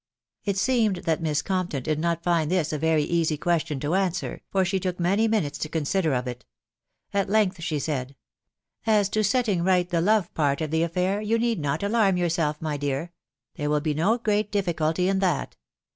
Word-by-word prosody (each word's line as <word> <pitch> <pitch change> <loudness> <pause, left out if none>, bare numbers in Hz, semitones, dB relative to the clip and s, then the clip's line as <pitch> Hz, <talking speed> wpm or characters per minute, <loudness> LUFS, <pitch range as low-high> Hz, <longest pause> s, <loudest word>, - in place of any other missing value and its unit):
It 200 -2 0
seemed 225 -1 +2
that 165 0 +1
Miss 150 -2 0
Compton 180 -8 -2
did 155 +1 -1
not 170 0 -1
find 170 -3 +1
this 170 -4 0
a. 150 - -2
veiy 160 0 +1
question 160 -4 0
to 150 +3 -1
answer, 185 -2 -1
far 190 -1 +2
she 190 +1 0
took 180 -1 -3
many 195 +6 +2
minuses 210 -10 0
to 155 - -3
consider 160 0 0
of 125 0 -1
it 125 0 -6 0.7
At 200 -1 0
length 200 -4 +2
she 165 -2 -1
said, 140 -2 -3 0.3
*,.. - - -34
u 220 - +4
As 205 -2 +3
to 215 +1 0
setting 215 -3 +1
4ght 180 0 +2
the 175 - 0
kwe 205 -1 +2
part 140 -3 +1
of 155 -2 -3
the 160 0 +1
affair, 180 +4 0
you 220 +2 +1
need 230 -2 0
not 145 +3 -2
alarm 200 -3 +2
yourself, 165 -4 0
my 155 -2 -2
dear... 145 +4 -2 0.5
there 145 0 -2
will 150 0 +2
be 150 0 -1
no 180 +10 +2
great 210 -2 0
difficulty 175 -3 0
in 195 0 +1
that 180 -6 0
175 Hz, 205 wpm, -25 LUFS, 155-195 Hz, 0.7 s, u